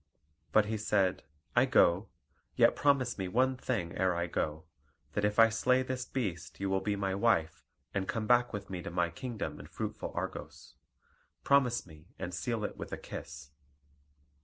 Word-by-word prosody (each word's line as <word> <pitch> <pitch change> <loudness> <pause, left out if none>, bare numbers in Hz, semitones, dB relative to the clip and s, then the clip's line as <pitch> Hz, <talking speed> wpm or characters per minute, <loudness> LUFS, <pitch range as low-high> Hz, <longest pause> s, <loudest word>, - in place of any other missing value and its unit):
But 110 -1 +5
he 110 +1 -2
said: 100 -5 +1 0.3
"I 125 +2 +6
go; 100 -7 +4 0.5
yet - - +5
promise 135 -6 +2
me 95 - -1
one 130 +7 +2
thing 110 -10 -2
ere 95 -1 +2
I 85 0 0
go: 80 -2 -2 0.5
that 100 - -1
if 105 0 +1
I 115 0 +8
slay 125 +3 +2
this 130 -1 -3
beast 100 -10 -4
you 95 0 -1
will 95 0 +1
be 105 -1 0
my 100 -1 -1
wife, 100 -6 +1 0.3
and 95 -1 -1
come 110 -2 -2
back 120 +2 +4
with 100 -2 -5
me 90 -2 -5
to - - -5
my 85 -1 0
kingdom 105 - -5
in - - -10
fruitful - - -5
Argos. - - -6 0.7
Promise 135 -4 +3
me, 80 -3 -15
and 90 -1 -5
seal 115 +4 -2
it - - -4
with - - -7
a - - -3
kiss." 70 0 -8
105 Hz, 180 wpm, -32 LUFS, 90-120 Hz, 0.7 s, I